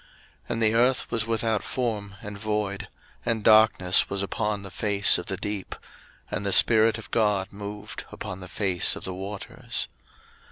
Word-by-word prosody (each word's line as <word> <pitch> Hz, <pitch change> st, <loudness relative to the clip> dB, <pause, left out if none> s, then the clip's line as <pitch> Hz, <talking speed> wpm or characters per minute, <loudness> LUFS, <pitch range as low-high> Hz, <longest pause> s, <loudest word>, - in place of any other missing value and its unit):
01:001:002 -, -, -27 dB, 0.4 s
And 115 Hz, -1 st, -1 dB
the 110 Hz, 0 st, +3 dB
earth 125 Hz, +3 st, +2 dB
was 115 Hz, -1 st, 0 dB
without 115 Hz, -2 st, 0 dB
form, 105 Hz, -6 st, -3 dB
and 105 Hz, -2 st, -7 dB
void; 105 Hz, -1 st, -3 dB, 0.4 s
and 115 Hz, -3 st, -1 dB
darkness 110 Hz, -4 st, +5 dB
was 100 Hz, 0 st, -1 dB
upon 105 Hz, +1 st, -2 dB
the 95 Hz, -, -9 dB
face 100 Hz, +1 st, +3 dB
of 90 Hz, -, -8 dB
the 95 Hz, -, -3 dB
deep. 100 Hz, 0 st, -5 dB, 0.6 s
And 95 Hz, -, -3 dB
the 100 Hz, -, -1 dB
Spirit 110 Hz, +2 st, +6 dB
of 110 Hz, -, -11 dB
God 105 Hz, -3 st, +1 dB
moved 105 Hz, +1 st, -8 dB
upon 95 Hz, -, -7 dB
the 95 Hz, -, -9 dB
face 95 Hz, -1 st, +1 dB
of -, -, -9 dB
the 95 Hz, -, -4 dB
waters. 95 Hz, +2 st, -4 dB
105 Hz, 170 wpm, -25 LUFS, 100-110 Hz, 0.6 s, Spirit